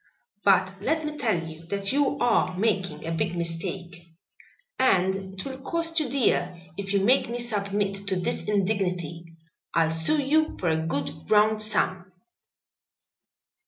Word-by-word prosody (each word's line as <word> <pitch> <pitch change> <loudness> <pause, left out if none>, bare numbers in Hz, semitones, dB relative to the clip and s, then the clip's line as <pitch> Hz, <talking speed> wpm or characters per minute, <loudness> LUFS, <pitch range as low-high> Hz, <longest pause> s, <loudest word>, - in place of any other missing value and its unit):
"But 190 0 +3
let 315 +7 0
me 300 0 -4
tell 205 - 0
you 160 +1 -11
that 200 +1 -2
you 280 0 +1
are 185 -6 +2
making 190 -7 -1
a 165 - -3
big 165 +1 -1
mistake 170 +1 -4 0.8
and 190 -7 +3 0.2
it - - -5
will 265 -1 -6
cost 330 +3 0
you 300 -4 -1
dear 180 -10 +1 0.2
if 195 +1 -5
you 200 -1 +2
make 255 +1 +3
me 240 - -3
submit 200 -3 -1
to 190 - 0
this 180 -1 -1
indignity. 180 -5 -1 0.5
I'll 165 -1 +3
sue 165 - +3
you 310 +3 +1
for 175 - 0
a 160 0 0
good 145 +1 -4
round 215 0 +4
sum." 185 -4 +1
195 Hz, 150 wpm, -26 LUFS, 175-230 Hz, 0.8 s, round